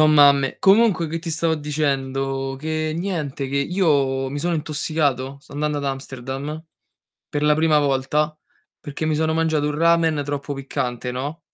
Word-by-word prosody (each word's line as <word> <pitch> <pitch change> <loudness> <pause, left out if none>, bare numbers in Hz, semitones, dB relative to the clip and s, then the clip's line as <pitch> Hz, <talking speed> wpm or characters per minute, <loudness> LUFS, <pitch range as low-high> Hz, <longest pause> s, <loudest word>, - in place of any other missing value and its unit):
so' 155 - +7
mamme. 140 -3 +5
Comunque 195 -4 +4
che 165 +2 -3
ti 165 +1 -7
stavo 165 0 +1
dicendo? 135 -2 -2
Che 155 +1 -2
niente, 160 -7 -3
che 140 - -2
io 140 -5 +1
mi 145 - -3
sono 175 +3 0
intossicato, 145 -4 -1
sto - - -17
andando 150 +1 -1
ad 140 - -4
Amsterdam 135 +3 -5 0.7
per 145 0 -2
la 150 0 +4
prima 155 -1 +3
volta 145 +2 0 0.4
perché 145 +2 -5
mi 155 - +1
sono 160 +1 +1
mangiato 160 -2 +1
un 150 0 -2
ramen 165 -2 +3
troppo 145 0 -3
piccante, 125 -2 -3
no? 140 +6 -4
150 Hz, 160 wpm, -22 LUFS, 135-160 Hz, 0.7 s, so